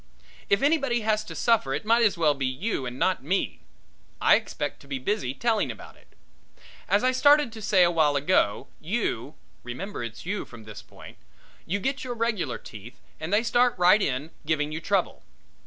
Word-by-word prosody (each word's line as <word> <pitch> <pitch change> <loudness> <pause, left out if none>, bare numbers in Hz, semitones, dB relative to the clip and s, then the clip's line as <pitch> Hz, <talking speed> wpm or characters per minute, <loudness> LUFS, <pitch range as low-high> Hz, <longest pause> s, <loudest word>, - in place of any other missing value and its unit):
If 200 +5 +2
anybody 275 -5 +2
has 215 0 +1
to - - -8
suffer 215 - +2
it 145 - -5
might 230 +2 +4
as 210 -5 +2
well 155 -3 +3
be 135 -2 -2
you 130 - -3
and 125 +1 -7
not 180 0 0
me; 140 - -1 0.6
I - - +5
expect - - -1
to - - -17
be 135 -1 -3
busy 135 - -2
telling 225 +1 0
about - - -9
it. - - -25 0.7
As 200 +3 +3
I 255 - +4
started 285 0 +4
to 220 - -9
say 200 -3 +4
awhile 160 -4 +3
ago, 140 - +1
you 155 - -3 0.3
remember 125 +7 -6
it's 115 +3 -8
you 200 +3 -2
from 120 -2 -13
this 110 -1 -10
point - - -14 0.5
you 195 - 0
get 270 +7 -2
your 245 -2 -4
regular 230 -4 -1
teeth 120 +3 -12 0.2
and 160 - -5
they 210 +3 +3
start 240 +1 +2
right 180 +4 +5
in 140 -1 -2
giving 150 -1 -1
you 160 +2 -5
trouble. - - -1
185 Hz, 190 wpm, -26 LUFS, 135-225 Hz, 0.7 s, I